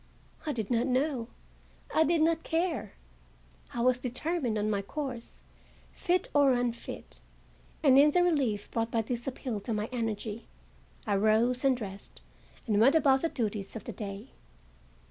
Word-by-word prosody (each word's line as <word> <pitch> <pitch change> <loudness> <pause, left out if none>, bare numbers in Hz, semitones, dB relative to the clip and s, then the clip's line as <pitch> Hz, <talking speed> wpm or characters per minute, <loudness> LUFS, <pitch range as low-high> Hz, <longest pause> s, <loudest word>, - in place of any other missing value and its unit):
I - - +1
did 230 -4 -3
not 235 +2 +2
know; 260 -2 0 0.7
I 320 - +5
did 320 0 +2
not 325 0 +2
care; 325 - -1 0.8
I 235 - -3
was 250 +1 +3
determined 255 -1 -2
on 210 0 0
my 205 -2 0
course, 255 +1 -6 0.5
fit 360 0 0
or 285 -2 +5
unfit, 245 -1 -4 0.6
and, 270 -2 +7
in 295 +2 +7
the 355 +4 +3
relief 265 -12 0
brought 225 0 -1
by 230 -1 0
this 240 +2 -4
appeal 250 -4 -3
to 215 +3 -3
my 210 +1 -2
energy, 225 -2 -3 0.6
I 205 -2 +1
rose 220 +5 +3
and 265 -2 +3
dressed 200 -4 -8 0.5
and 210 -3 +2
went 270 +7 +6
about 270 -4 +4
the 330 - +1
duties 210 -6 -3
of 220 - -6
the - - -6
day. 205 +3 -7
245 Hz, 160 wpm, -30 LUFS, 215-285 Hz, 0.8 s, and